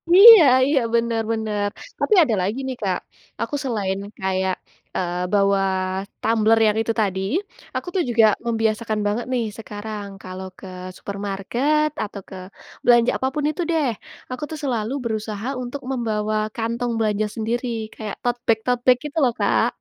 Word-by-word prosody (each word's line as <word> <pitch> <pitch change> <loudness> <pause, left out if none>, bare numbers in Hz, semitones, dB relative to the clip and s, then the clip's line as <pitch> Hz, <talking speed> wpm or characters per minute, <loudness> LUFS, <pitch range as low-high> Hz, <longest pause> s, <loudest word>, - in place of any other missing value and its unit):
Iya 430 -2 +11 0.2
iya, 285 -1 +3 0.2
benar 230 -1 +1
benar. 215 -2 -1 0.3
Tapi - - +2
ada 240 -8 +1
lagi 205 +8 -1
nih 255 -2 -4
Kak, 190 -3 0 0.4
aku 290 - -2
selain 200 -7 -1 0.2
kayak, 190 -1 0 0.4
eee, 180 0 -2
bawa 200 -1 +4 0.6
tumbler 225 0 +3
yang 210 +1 +1
itu 225 0 -1
tadi, 190 -2 0 0.5
aku - - -3
tuh 360 - +2
juga 230 -1 +5 0.2
membiasakan 225 -1 0
banget 215 +4 -1
nih, 240 -2 +1
sekarang, 210 -1 -6 0.2
kalau 185 +1 -7
ke 190 - -10 0.3
supermarket 205 +10 -1
atau 205 -1 -7
ke 190 - -9 0.5
belanja 240 -1 +5
apapun 275 +3 -2
itu 310 +3 -3
deh, 310 -4 +2 0.4
aku 255 +4 -5
tuh 310 - -5
selalu 235 -5 -1
berusaha 220 -1 -3 0.2
untuk 260 +3 -6
membawa 215 -4 -1 0.2
kantong 235 +1 -2
belanja 215 -1 +1
sendiri. 235 +3 -2 0.3
Kayak 215 -2 -6
totebag-totebag 245 +1 +2
gitu 300 +2 -7
loh 245 -3 +3
Kak. - - +3
225 Hz, 145 wpm, -22 LUFS, 205-245 Hz, 0.6 s, Iya